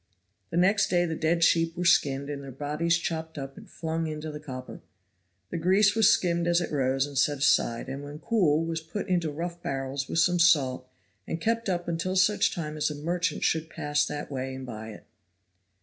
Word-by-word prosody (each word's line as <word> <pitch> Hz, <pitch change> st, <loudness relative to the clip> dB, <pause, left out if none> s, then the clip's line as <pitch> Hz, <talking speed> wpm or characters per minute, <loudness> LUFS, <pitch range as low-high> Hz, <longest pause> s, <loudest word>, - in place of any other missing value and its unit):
The 165 Hz, -, -3 dB
next 195 Hz, +4 st, +4 dB
day 175 Hz, -1 st, +2 dB
the 165 Hz, -, -2 dB
dead 165 Hz, +1 st, +1 dB
sheep 165 Hz, 0 st, +3 dB
were 180 Hz, -, -2 dB
skinned 140 Hz, -5 st, +3 dB
and 145 Hz, -1 st, -5 dB
their 135 Hz, -, -8 dB
bodies 150 Hz, +5 st, 0 dB
chopped 160 Hz, -1 st, -4 dB
up 135 Hz, -1 st, -6 dB
and 210 Hz, -1 st, -13 dB
flung 165 Hz, -1 st, -3 dB
into 155 Hz, 0 st, -5 dB
the 150 Hz, -, -7 dB
copper. 130 Hz, -4 st, -8 dB, 0.7 s
The 170 Hz, -, -2 dB
grease 195 Hz, +4 st, +4 dB
was 220 Hz, -3 st, +5 dB
skimmed 170 Hz, -1 st, +1 dB
as 175 Hz, 0 st, +3 dB
it 175 Hz, -, -4 dB
rose, 135 Hz, -2 st, +1 dB
and 145 Hz, -1 st, -9 dB
set 145 Hz, +2 st, +2 dB
aside, 135 Hz, -4 st, +2 dB
and 135 Hz, +2 st, -5 dB
when 145 Hz, +1 st, -8 dB
cool 165 Hz, -5 st, +2 dB
was 165 Hz, 0 st, -3 dB
put 165 Hz, +7 st, -5 dB
into 175 Hz, -4 st, +1 dB
rough 170 Hz, +3 st, -5 dB
barrels 135 Hz, -1 st, -3 dB
with -, -, -2 dB
some 175 Hz, +1 st, +3 dB
salt 135 Hz, -7 st, +3 dB, 0.4 s
and 165 Hz, -, -3 dB
kept 230 Hz, +3 st, 0 dB
up 175 Hz, -1 st, -2 dB
until 170 Hz, +2 st, -2 dB
such 200 Hz, +3 st, +3 dB
time 155 Hz, -3 st, -5 dB
as 150 Hz, -, +1 dB
a 150 Hz, -, -5 dB
merchant 170 Hz, +2 st, -2 dB
should 160 Hz, 0 st, 0 dB
pass 145 Hz, -1 st, 0 dB
that 145 Hz, 0 st, -5 dB
way 130 Hz, -1 st, -4 dB
and 130 Hz, 0 st, -7 dB
buy 110 Hz, -2 st, -7 dB
it. 105 Hz, -, -11 dB
160 Hz, 210 wpm, -27 LUFS, 140-175 Hz, 0.7 s, was